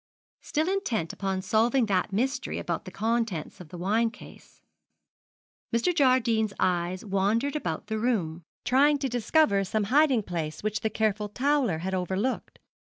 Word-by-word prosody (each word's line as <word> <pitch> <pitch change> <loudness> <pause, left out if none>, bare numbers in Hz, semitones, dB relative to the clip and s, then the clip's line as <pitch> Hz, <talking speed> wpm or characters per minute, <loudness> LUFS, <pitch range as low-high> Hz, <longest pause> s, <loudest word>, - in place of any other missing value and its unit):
Still 310 +2 -1
intent 255 - -1
upon 190 -1 -2
solving 225 +5 +2
that 195 -1 0
mystery 255 +8 -1
about - - -3
the - - -8
contents 220 -6 -2
of 170 - -12
the 180 - -9
wine 215 +6 +1
case, 225 - -15 1.1
Mr. 235 +10 +2
Jardine's 235 - +2
eyes 180 +1 0
wandered 210 +8 0
about 165 - -3
the 220 +1 -3
room, 185 -9 -1 0.2
trying 285 +4 +4
to 275 -1 -2
discover 240 -3 +2
some 210 +3 -1
hiding 280 -6 +4
place 165 -3 -4
which 215 0 -1
the 220 - -1
careful 210 -1 -1
had 245 - +1
overlooked. 190 +7 -2
220 Hz, 145 wpm, -27 LUFS, 190-255 Hz, 1.1 s, trying